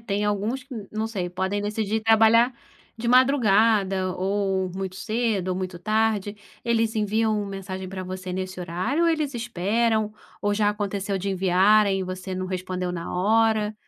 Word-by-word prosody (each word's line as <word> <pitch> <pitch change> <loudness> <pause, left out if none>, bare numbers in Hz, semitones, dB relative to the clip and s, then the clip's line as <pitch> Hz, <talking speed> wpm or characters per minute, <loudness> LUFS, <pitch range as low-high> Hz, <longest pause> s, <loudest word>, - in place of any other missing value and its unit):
tem 205 -2 -2
alguns 210 +6 -1
que, 255 0 -10 0.2
não 215 +1 -1
sei, 190 -6 -4
podem 190 +3 -2
decidir 215 +1 -1
trabalhar 225 +2 +5 0.5
de 235 +1 -2
madrugada, 215 -7 +3
ou 190 0 -1
muito 190 -1 -4
cedo, 215 -2 -1
ou 185 - 0
muito 185 -1 -4
tarde. 215 0 0 0.3
Eles 230 -1 +1
enviam 215 0 +1
mensagem 190 -1 -6
para 185 0 -6
você 185 0 -6
nesse 185 0 -4
horário, 185 - -1
ou - - +4
eles 310 -4 0
esperam, 225 -1 0 0.3
ou 205 0 +1
já 205 0 +2
aconteceu 200 -1 -2
de 195 +2 -2
enviarem, 195 +2 +3
e - - -1
você 185 +1 -5
não 185 0 -3
respondeu 185 -1 -3
na 170 -1 -5
hora? 215 +2 +2
205 Hz, 160 wpm, -24 LUFS, 185-225 Hz, 0.5 s, trabalhar